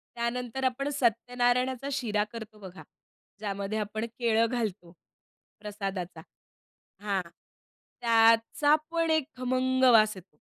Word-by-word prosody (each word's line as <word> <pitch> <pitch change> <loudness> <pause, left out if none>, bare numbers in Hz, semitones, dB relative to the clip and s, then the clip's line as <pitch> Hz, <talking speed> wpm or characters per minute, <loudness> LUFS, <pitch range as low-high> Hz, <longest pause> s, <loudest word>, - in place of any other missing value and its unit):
त्यानंतर 245 +2 -3
आपण 260 +2 0
सत्यनारायणाचा 245 +1 +1
शिरा 220 -7 0
करतो 220 -2 -9
बघा. 180 -5 -11 0.6
ज्यामध्ये 200 0 -3
आपण 215 +2 -3
केळं 230 -1 +3
घालतो 210 -7 -3 0.7
प्रसादाचा. 195 -4 -5 0.8
हां. 200 -2 -1 0.8
त्याचा 230 +5 +4 0.2
पण 330 -1 0
एक 315 -2 +3
खमंग 255 +1 0
वास 215 -1 +5
येतो. 180 -4 -16
230 Hz, 105 wpm, -28 LUFS, 210-250 Hz, 0.8 s, वास